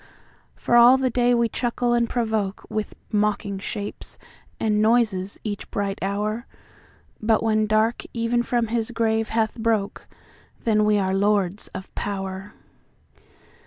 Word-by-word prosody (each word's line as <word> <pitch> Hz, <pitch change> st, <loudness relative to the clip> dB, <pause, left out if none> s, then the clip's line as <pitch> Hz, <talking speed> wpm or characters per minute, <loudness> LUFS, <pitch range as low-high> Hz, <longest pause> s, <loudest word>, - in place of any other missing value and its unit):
For 240 Hz, -, 0 dB
all 240 Hz, +2 st, +8 dB
the 260 Hz, -1 st, 0 dB
day 245 Hz, 0 st, +3 dB
we 235 Hz, 0 st, +2 dB
chuckle 240 Hz, +1 st, -1 dB
and 235 Hz, -1 st, +2 dB
provokeWith 215 Hz, -2 st, -2 dB, 0.2 s
mocking 205 Hz, -2 st, 0 dB
shapes 205 Hz, +1 st, -6 dB, 0.4 s
and 210 Hz, -1 st, +1 dB
noises 215 Hz, -4 st, +1 dB
each 205 Hz, -2 st, -5 dB
bright 200 Hz, -1 st, -2 dB
hour, 210 Hz, +4 st, -2 dB, 0.7 s
But 220 Hz, 0 st, +2 dB
when 215 Hz, -1 st, +2 dB
dark 215 Hz, +2 st, +1 dB
even 235 Hz, +1 st, 0 dB
from 240 Hz, -2 st, 0 dB
his 230 Hz, 0 st, -1 dB
grave 225 Hz, -2 st, 0 dB
hath 225 Hz, 0 st, 0 dB
brokeThen 220 Hz, 0 st, -3 dB
are -, -, +4 dB
we 210 Hz, 0 st, +3 dB
lords 195 Hz, 0 st, +1 dB
of 190 Hz, 0 st, -8 dB
power. 195 Hz, 0 st, -5 dB
215 Hz, 125 wpm, -24 LUFS, 205-235 Hz, 0.7 s, all